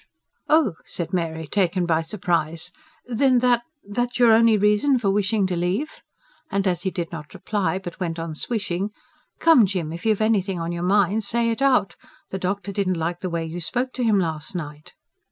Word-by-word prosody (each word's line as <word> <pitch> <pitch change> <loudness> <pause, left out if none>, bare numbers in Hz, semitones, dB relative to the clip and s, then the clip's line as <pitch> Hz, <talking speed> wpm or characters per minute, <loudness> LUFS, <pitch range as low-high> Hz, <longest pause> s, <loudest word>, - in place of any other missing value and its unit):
'" - - -49
"Oh!" 305 - +4
said 170 0 -6
Mary, 160 -2 -2
taken 180 +1 +1
by 165 -1 +2
surprise. 165 -2 -1 0.3
"Then 250 +2 +3
that 240 -1 +4 0.3
that's 245 +4 -2
your 240 -2 +6
only 225 0 +5
reason 210 +7 +3
for 205 -5 +1
wishing 205 0 +1
to 185 -1 -1
leave?" 185 - -2 0.5
And 195 0 0
as 180 -2 0
he 190 - -1
did 175 -2 -4
not 150 -3 -8
reply, 200 -3 -1
but 180 -2 -8
went 170 -3 -2
on 165 -1 -4
swishing: 195 +1 -2 0.5
"Come, 315 -11 +6
Jim, 175 -5 -3
if 170 - -8
you've 215 -2 +2
anything 200 -4 +1
on 165 +1 -3
your 170 0 -4
mind, 200 +3 +2
say 230 +2 0
it 230 - -4
out. 255 -10 +2 0.3
The 190 - -3
doctor 200 +2 -2
didn't 185 -2 0
like 170 +2 -2
the 185 - -3
way 170 -1 -2
you 165 +2 -5
spoke 250 +9 -1
to 250 - -2
him 220 -3 +3
last 160 -1 -2
night." 150 -3 -7
195 Hz, 195 wpm, -23 LUFS, 170-220 Hz, 0.5 s, your